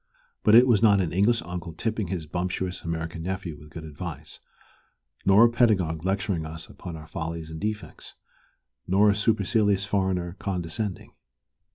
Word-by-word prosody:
But 105 - +5
it 120 +2 +9
was 115 -5 +4
not 105 -3 +6
an 85 -4 -1
English 105 +4 +3
uncle 85 -1 -6
"tipping" 110 +1 -2
his 85 -2 -3
bumptious 90 +2 -3
American 80 0 -4
nephew 95 -2 -4
with 75 +1 -14
good 80 +1 -8
advice, 80 0 -7 0.9
nor 100 +4 +8
a - - +5
pedagogue 95 -10 +2
lecturing 95 -3 -1
us 80 0 -7
upon 85 - -8
our 80 -1 -9
follies 80 -1 -5
and 80 - -6
defects, 105 0 -5 0.7
nor 100 +3 +5
a - - 0
supercilious 105 -2 +2
foreigner 95 -3 -1
condescending. 90 +1 -3
90 Hz, 155 wpm, -26 LUFS, 80-105 Hz, 0.9 s, it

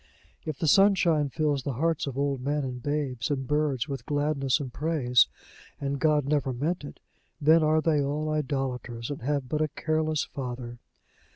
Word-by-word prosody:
If 155 -3 -3
the - - -2
sunshine 170 -5 +4
fills 145 -1 0
the 135 +1 -3
hearts 160 +4 0
of 135 -1 -5
old 140 -2 0
men 145 +2 -1
and 125 -2 -5
babes 140 -4 -2
and 135 -2 -1
birds 150 -3 0
with 135 -2 -6
gladness 145 -2 +1
and 130 -4 -6
praise, 145 -6 +3 0.5
and 140 0 -2
God 150 -2 +3
never 140 -2 0
meant 150 +7 -2
it, 145 - -9 0.4
then 160 +2 +5
are 155 0 +3
they 155 -2 +2
all 145 +2 -1
idolaters, 135 -5 -2
and 145 - -5
have 140 +1 -1
but 150 +4 -1
a 155 - +2
careless 155 +1 -1
Father. 120 -2 -6
145 Hz, 175 wpm, -27 LUFS, 130-155 Hz, 0.5 s, then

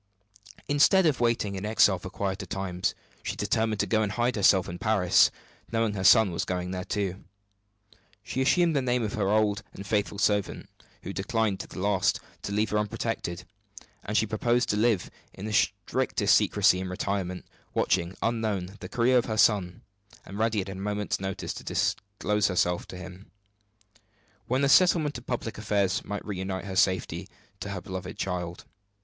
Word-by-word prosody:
Instead 150 +6 +4
of 150 -4 +2
waiting 115 -4 +1
in 95 0 -5
exile 105 -3 +3
for 90 - -8
quieter 95 +1 -3
times, 90 -1 -2 0.3
she - - -4
determined 110 -1 0
to - - +2
go 110 -1 +1
and 105 -1 -1
hide 120 +2 0
herself 95 -3 +4
in 85 +1 -6
Paris, 100 -3 +4 0.4
knowing 115 -2 +1
her 95 -2 -3
son 100 0 +6
was 85 - -2
going 90 0 -3
there 90 -1 -3
too. 95 -1 -3 1.0
She 130 - -3
assumed 165 +4 +3
the 140 - +2
name 125 -1 0
of 105 - -3
her 100 -3 0
old 105 -1 +2
and 100 - -9
faithful 105 0 -1
servant, 105 -1 0 0.4
who 100 - -5
declined 105 -1 -1
to - - -6
the - - -12
last 100 0 +1 0.2
to - - -5
leave 105 +2 0
her 105 - +2
unprotected; 105 -4 -3 0.6
and 105 +1 -1
she - - +3
proposed 120 +3 0
to - - +2
live 105 -3 +1 0.2
in 95 - -7
the 110 - -4
strictest 100 -2 +1
secrecy 90 - +4
and 95 - -4
retirement, 90 -1 -3 0.3
watching, 90 +1 +1
unknown, 105 -4 -1
the - - -8
career 125 +1 +3
of - - -2
her 110 -2 -3
son, 95 -5 +2 0.4
and 100 +2 -8
ready 110 -2 +1
at 95 - -7
a - - -5
moment's 105 +2 -2
notice 95 0 -4
to - - -9
disclose 105 +1 0
herself 90 -1 0
to 90 - -9
him, 90 +2 -10 1.2
when 130 +3 +1
the - - +4
settlement 155 -3 +4
of 120 - -20
public 115 -3 -3
affairs 100 -3 0
might 105 0 -5
reunite 95 -1 -4
her 95 -2 -5
safely 95 -1 +1 0.3
to 100 - -5
her 100 -2 -4
beloved 95 0 -6
child. 90 -2 -4
100 Hz, 180 wpm, -27 LUFS, 95-110 Hz, 1.2 s, son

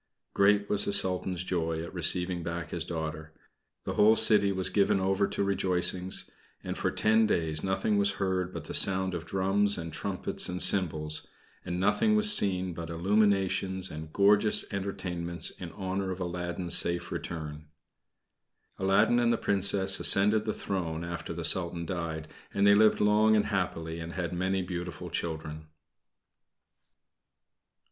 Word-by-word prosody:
Great 100 +1 +3
was 105 0 +3
the 100 - +2
Sultan's 90 -1 0
joy 80 -3 -2
at 85 - -9
receiving 90 0 0
back 85 0 -5
his - - -1
daughter. 80 -1 -6 0.5
The - - -4
whole 110 +2 +5
city 105 -3 +3
was 95 -1 0
given 100 -1 +2
over 95 +1 +1
to - - -2
rejoicings, 90 -1 0 0.4
and - - -5
for - - -1
ten 110 +1 +2
days 80 -5 +1
nothing 100 +2 0
was 100 0 +2
heard 95 -2 -2
but 85 -4 -7
the - - -8
sound 95 -1 +2
of 85 -1 -5
drums 100 +2 +1
and 85 -2 -7
trumpets 95 +1 -2
and 90 0 -4
cymbals, 80 -6 +1 0.4
and 90 0 -4
nothing 160 - +2
was 215 -1 +6
seen 95 -2 +2
but 85 0 -7
illuminations 95 +1 0
and 80 0 -8
gorgeous 105 +3 +5
entertainments 90 -4 -3
in 85 -2 -9
honor 95 -1 -4
of 95 0 -5
Aladdin's 90 0 -3
safe 85 0 -1
return. 75 -2 -6 1.1
Aladdin 95 +5 +3
and 120 -1 +2
the 115 - +1
Princess 95 -1 +1
ascended 105 +2 +2
the 110 - -1
throne 85 -4 -4
after 85 -1 -6
the - - -3
Sultan 85 -2 +1
died 80 -3 -5 0.2
and 100 - +1
they 100 - +6
lived 110 +1 +4
long 105 +1 +4
and 105 - +2
happily 85 -4 -3
and 85 +1 -7
had 90 -2 -4
many 95 +1 -1
beautiful 90 -3 -6
children. 80 -2 -5
95 Hz, 155 wpm, -28 LUFS, 85-100 Hz, 1.1 s, was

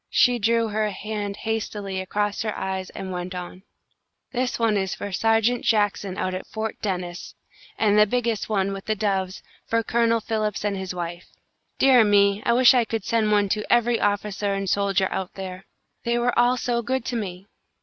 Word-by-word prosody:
She 245 -1 +4
drew 230 +1 +2
her 215 0 0
hand 205 0 -4
hastily 210 -3 -3
across 205 +2 -1
her 215 -1 -3
eyes 190 -1 -3
and 190 -1 -7
went 180 +1 -5
on: 180 +1 -7 0.7
"This 250 -1 -1
one 225 -2 +2
is 190 -2 -1
for 205 - -6
Sergeant 225 +4 +2
Jackson 205 -3 +1
out 185 -1 -1
at 185 - -5
Fort 220 0 -5
Dennis, 180 -3 -4 0.4
and 210 -1 +3
the 210 - +6
biggest 235 -2 -1
one, 195 -2 0
with 195 0 -7
the 215 - 0
doves, 195 -2 -1 0.2
for 230 0 +1
Colonel 230 0 +2
Philips 215 -2 -2
and 205 -1 0
his 190 -1 -5
wife. 175 0 -5 0.5
Dear 260 -3 +6
me! 200 -1 +4
I 235 - +4
wish 250 +1 +7
I 245 -2 +4
could 225 -2 -4
send 220 -2 +1
one 205 -1 +3
to 210 +1 0
every 240 -1 +3
officer 205 0 0
and 195 0 -3
soldier 195 -1 +2
out 190 -1 -4
there. 190 -1 -7 0.4
They 235 0 +1
were 240 0 +1
all 245 +1 +4
so 240 -1 0
good 260 +1 -2
to 245 - -3
me!" 190 -4 -4
210 Hz, 190 wpm, -24 LUFS, 190-230 Hz, 0.7 s, wish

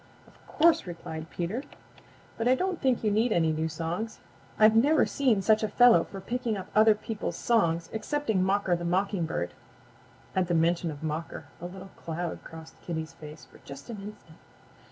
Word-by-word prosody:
"Of - - -21
course," 325 - +3
replied 165 -2 -7
Peter, 180 +9 -3 0.7
"but 230 - -1
I 255 - +5
don't 370 +3 -2
think 260 -4 +1
you 215 - +2
need 220 +3 +2
any 165 -5 +3
new 160 +1 -1
songs. 170 +8 -4 0.4
I've 215 +1 +6
never 290 +7 +5
seen 240 -8 +1
such 215 +1 +4
a 215 - +1
fellow 245 +3 +5
for 195 - -9
picking 235 +2 -2
up 185 - -7
other 215 0 +6
people's 215 0 -4
songs 170 -8 +1
excepting 220 -2 -1
Mocker 190 -1 +2
the 175 - -5
Mockingbird." 175 - -1 0.8
At 185 -2 +2
the 175 - +1
mention 170 +1 +2
of 150 0 -8
Mocker 155 +1 -4 0.2
a 175 - -4
little 190 +1 -10
cloud 170 +1 -5
crossed 160 0 -12
Kitty's 160 -1 -5
face 155 -1 -11
for - - -19
just 140 - -10
an 220 - -6
instant. 200 -6 -11
190 Hz, 175 wpm, -28 LUFS, 165-225 Hz, 0.8 s, I've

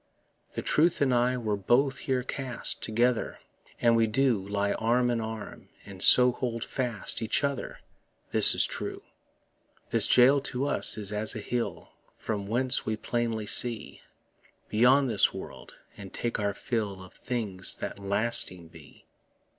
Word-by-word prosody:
The - - -5
truth 165 +3 +2
and 135 -3 +2
I 125 +1 +1
were 110 -4 -2
both 125 +7 +1
here 130 -2 -2
cast 130 -1 -4
Together, 120 +2 0 0.4
and 115 -1 +3
we 115 -1 +2
do 120 0 +1
Lie 100 0 -1
arm 120 +3 +1
in 115 -1 -1
arm, 110 -1 -8 0.2
and 95 -2 -11
so 125 +4 +5
hold 120 -2 -4
fast 120 -3 -2
Each 110 +5 0
other; 140 -1 -3 0.5
this - - +4
is - - +6
true. - - -6 0.9
This - - +8
jail 135 +3 +5
to 135 -1 -3
us 145 - +2
is 105 -1 -4
as 105 +1 0
a - - -4
hill, 120 +3 -4 0.3
From 100 -3 -5
whence 125 +4 0
we 110 -1 -3
plainly 115 -2 -3
see 115 +2 -1 0.7
Beyond 125 +5 +3
this 120 - +2
world, - - -10 0.2
and 100 -2 -11
take 120 -1 -3
our 100 -1 -2
fill 100 -6 -4
Of 95 - -15
things 105 -7 +2
that - - -7
lasting 100 -4 -1
be. 80 -3 -17
115 Hz, 155 wpm, -27 LUFS, 105-125 Hz, 0.9 s, This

